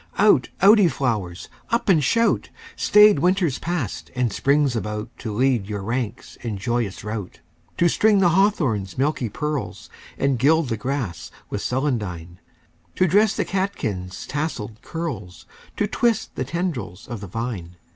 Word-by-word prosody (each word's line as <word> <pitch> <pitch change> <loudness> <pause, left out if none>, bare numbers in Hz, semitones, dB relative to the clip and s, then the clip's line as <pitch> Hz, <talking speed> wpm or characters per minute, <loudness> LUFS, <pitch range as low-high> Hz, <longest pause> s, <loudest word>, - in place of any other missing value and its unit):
Out, 200 -10 +4
out, 210 +3 +8
ye 195 - +6
flowers! 105 - -2 0.2
Up 235 +1 0
and 165 -7 +4
shout! 230 - +2 0.3
Staid 210 -6 +6
Winter's 175 -3 +1
passed 165 - -3
and 125 -4 0
Spring's 140 -2 +2
about 105 +1 -4
To 110 - -4
lead 120 -2 +1
your 105 -2 -4
ranks 115 +1 -4
in 110 -4 -4
joyous 115 -1 -2
rout; 105 -3 -5 0.4
To 170 - +4
string 210 +4 +3
the 190 -3 +4
hawthorn's 155 - +1
milky 135 -3 0
pearls, 150 +5 -4 0.3
And 135 -3 +1
gild 155 +2 +3
the 115 - 0
grass 105 - -3 0.2
with 105 - -2
celandine; 105 - -2 0.6
To 185 - +3
dress 205 +5 +3
the - - 0
catkins' 105 - -3
tasselled 130 -8 -4
curls, 130 - -6 0.3
To 205 - +2
twist 225 +1 0
the 130 - -3
tendrils 125 - -4
of 120 -4 -6
the 100 - -7
vine. 95 -5 -5
130 Hz, 150 wpm, -23 LUFS, 105-170 Hz, 0.6 s, out